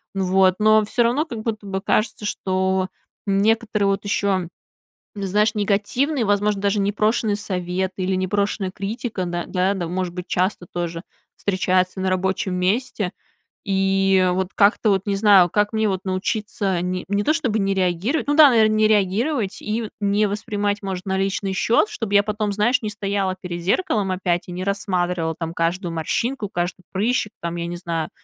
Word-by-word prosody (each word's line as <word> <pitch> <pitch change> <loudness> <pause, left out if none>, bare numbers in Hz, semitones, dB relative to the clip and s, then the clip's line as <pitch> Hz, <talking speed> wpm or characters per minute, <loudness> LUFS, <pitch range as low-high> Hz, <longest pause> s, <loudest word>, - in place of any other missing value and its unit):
Вот. 190 -1 +3
Но 215 0 +5
всё 240 +3 +1
равно, 250 +7 +1
как 235 -9 -6
будто 215 -2 -4
бы, 190 0 -2
кажется, 215 0 0
что 190 -1 0 0.4
некоторые 210 +1 +1
вот 195 0 0
еще, 195 -4 0 0.7
знаешь, 210 +3 +1
негативные, 220 +7 0
возможно, 205 0 +1
даже 200 +1 +1
непрошенные 210 +1 +1
советы 185 -1 -3
или 190 +1 0
непрошенная 195 +1 -1
критика, 205 0 -4
да 175 0 -3
да, 185 +1 +1
может 180 0 -3
быть, 180 0 -6
часто 180 -1 -1
тоже 170 -1 -3 0.4
встречается 185 -1 0
на 190 - 0
рабочем 190 0 -1
месте, 200 +1 0 0.6
и 195 -1 +2
вот 185 0 -1
как-то 210 +1 +4
вот 195 +1 0
не 200 - +1
знаю. 195 -4 +6
Как 205 +3 +1
мне 220 -1 +1
вот 190 -1 -2
научиться 190 -1 -1
не 180 0 -2
не 205 0 +1
то 310 - +2
чтобы 250 -10 0
не 195 0 +1
реагировать 190 - 0
ну 290 - +2
да, 305 -3 +9
наверно, 220 -2 +4
не 215 0 +4
реагировать 210 +3 +1
и 220 +1 -3
не 205 +1 +2
воспринимать, 205 0 -2
может, 190 -1 -4
на 190 0 0
личный 195 0 -1
счет? 235 - +2
Чтобы 225 - -4
я 200 - +7
потом, 210 0 -2
знаешь, 215 +6 +2
не 215 - -1
стояла 200 -2 -1
перед 175 -2 -5
зеркалом 200 - +1
опять 180 -2 -1
и - - -6
не 180 +1 -4
рассматривала 180 -4 -1
там 165 -1 -4
каждую 170 +1 -1
морщинку, 215 - -2
каждый 175 +1 -3
прыщик, 215 +2 0
там, 170 0 -3
я 170 - -3
не 175 - -5
знаю, 165 -2 -3
195 Hz, 170 wpm, -22 LUFS, 185-215 Hz, 0.7 s, да